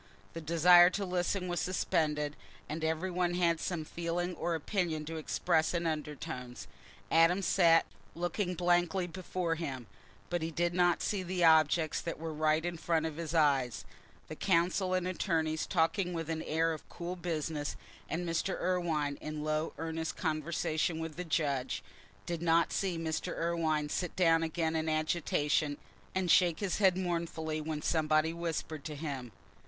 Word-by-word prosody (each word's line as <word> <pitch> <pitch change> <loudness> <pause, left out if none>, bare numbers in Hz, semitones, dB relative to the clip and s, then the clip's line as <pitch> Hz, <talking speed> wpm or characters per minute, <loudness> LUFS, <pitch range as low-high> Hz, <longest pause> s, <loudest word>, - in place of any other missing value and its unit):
The 165 - -6
desire 175 +2 +7
to 195 +2 -2
listen 180 +1 -1
was 175 -1 -1
suspended, 150 -5 0 0.3
and 155 +2 -4
every 160 +4 -1
one 175 0 0
had 170 -2 +2
some 170 -4 -3
feeling 170 +2 -2
or 170 0 -1
opinion 160 -2 -1
to 160 +1 -5
express 160 +1 +1
in 170 0 -1
undertones. 150 - -4 0.4
Adam 170 +4 +4
sat 165 -3 +5 0.3
looking 175 +2 -2
blankly 175 +1 +2
before 180 -1 -3
him, 140 -7 -4 0.5
but 175 -1 0
he 160 - -2
did 175 +2 0
not 175 -1 +3
see 205 -2 0
the 180 -1 -1
objects 160 0 +4
that 165 - -4
were 160 0 -5
right 155 +1 +1
in 175 -1 -3
front 160 -1 0
of 160 -1 -4
his 165 -1 -4
eyes—the 130 -4 -1
counsel 185 +1 +2
and 180 -1 0
attorneys 160 -4 -1
talking 180 +1 +1
with 165 -1 -3
an 160 -1 -2
air 165 +1 +1
of 155 - -10
cool 175 +1 -5
business, 160 -4 -3 0.3
and 175 +2 -2
Mr. 170 +3 -1
Irwine 165 -6 0
in 155 0 -5
low 155 +1 -1
earnest 160 0 -3
conversation 160 0 -1
with 160 -1 -5
the 180 - -4
judge—did 155 +2 -3
not 170 0 +3
see 185 -4 -1
Mr. 160 -1 -3
Irwine 160 -3 0
sit 180 +3 -2
down 165 -3 +4
again 160 0 -1
in 160 0 0
agitation 155 -2 +1 0.4
and 185 -2 +1
shake 175 -3 +4
his 200 -2 -1
head 190 -3 +4
mournfully 165 -3 -2
when 155 -1 -4
somebody 155 0 +2
whispered 160 -3 -4
to 150 - -5
him. 140 -5 -5
165 Hz, 160 wpm, -32 LUFS, 155-175 Hz, 0.5 s, desire